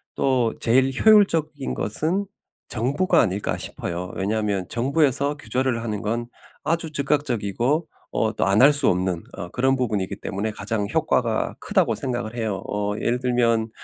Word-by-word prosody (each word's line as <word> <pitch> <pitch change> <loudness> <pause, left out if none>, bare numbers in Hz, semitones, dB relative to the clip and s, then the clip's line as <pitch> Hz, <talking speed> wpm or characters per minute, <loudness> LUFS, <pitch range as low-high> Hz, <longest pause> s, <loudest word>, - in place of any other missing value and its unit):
또 125 -4 +1
제일 130 +3 +3
효율적인 165 -10 +3
것은 165 - -1 0.4
정부가 145 - +1
아닐까 95 +2 -1
싶어요. 90 +1 -5
왜냐하면 100 -1 -1
정부에서 140 +3 +1
규제를 130 -4 -1
하는 105 -3 -3
건 115 +3 -1 0.4
아주 165 0 -1
즉각적이고 140 - 0 0.3
어 110 0 0
또 - - +1
안 100 +3 +4
할 145 +2 +8
수 145 -2 +4
없는 90 -1 -1
어 90 -3 -7
그런 130 +6 +1
부분이기 110 -7 -2
때문에 100 +3 -3
'가장 105 0 -2
효과가 - - 0
크다.'고 - - +1
생각을 120 -3 -4
해요. 110 -5 -2
어 105 0 -1
예를 120 +1 0
들면 115 -3 +1
120 Hz, 320 characters per minute, -23 LUFS, 105-140 Hz, 0.4 s, 할